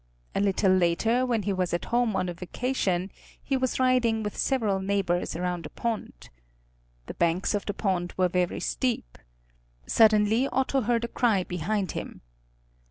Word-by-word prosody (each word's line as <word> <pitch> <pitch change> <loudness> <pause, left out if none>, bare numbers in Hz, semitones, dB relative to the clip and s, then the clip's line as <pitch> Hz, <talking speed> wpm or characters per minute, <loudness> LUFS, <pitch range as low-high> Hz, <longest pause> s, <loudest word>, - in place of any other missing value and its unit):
A - - 0
little 195 -1 +2
later, 185 +8 +2
when 230 -4 0
he 200 - 0
was 180 -2 0
at 175 - -4
home 240 -3 +2
on 185 - 0
a 175 - -3
vacation, 185 0 -2 0.3
he 275 - -2
was 260 -1 -1
riding 250 -4 +2
with 210 - -4
several 220 -8 0
neighbors 190 -3 -1
around 175 -2 -3
a - - -14
pond. 225 - -5 0.8
The - - -7
banks 170 +4 +1
of 205 - -2
the 205 - -2
pond 180 -4 -1
were 185 -1 +3
very 180 0 -1
steep. 245 - -2 0.7
Suddenly 220 - +4
Otto 265 0 0
heard 235 0 +1
a - - -1
cry 225 -5 +1
behind 185 +3 -2
him. - - -7
205 Hz, 165 wpm, -27 LUFS, 180-235 Hz, 0.8 s, Suddenly